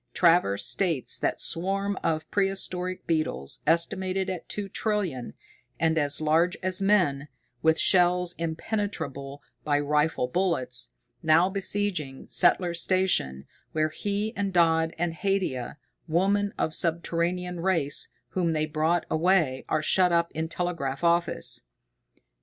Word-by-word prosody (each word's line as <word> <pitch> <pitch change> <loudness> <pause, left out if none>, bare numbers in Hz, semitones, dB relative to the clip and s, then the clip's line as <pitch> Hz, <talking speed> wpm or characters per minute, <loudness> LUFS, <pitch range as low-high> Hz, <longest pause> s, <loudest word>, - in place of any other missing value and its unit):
Travers 165 - +3
states 170 -9 +1
that - - -1
swarm 195 +4 -1
of 155 -1 -1
prehistoric 185 -2 -1
beetles, 155 - -2
estimated 185 +3 +1
at 180 - -7
two 205 -1 -3
trillion, 195 - -2 0.4
and 160 0 +2
as 145 -3 +2
large 160 +3 +2
as 185 +1 0
men, 180 -9 +2 0.3
with 160 0 +3
shells 180 -1 +3
impenetrable 160 - -4 0.2
by 145 -1 +1
rifle 150 -2 +1
bullets, 130 - 0 0.3
now 165 +4 +4
besieging 190 -8 -2
Settler's 175 -1 +3
Station, 180 - +1 0.3
where 155 0 +1
he 205 +6 -3
and 200 -1 -1
Dodd 165 -2 +3
and 170 0 -1
Haidia, 165 -9 -2 0.3
woman 195 +5 +1
of 160 - -1
subterranean 170 +2 -1
race 165 -6 0 0.2
whom 175 -3 0
they 155 0 0
brought 155 +3 0
away, 160 -5 +1
are 155 - 0
shut 180 +2 +3
up 170 0 +1
in 160 +1 -3
telegraph 165 -5 -3
office. 170 0 +2
170 Hz, 125 wpm, -26 LUFS, 155-185 Hz, 0.4 s, now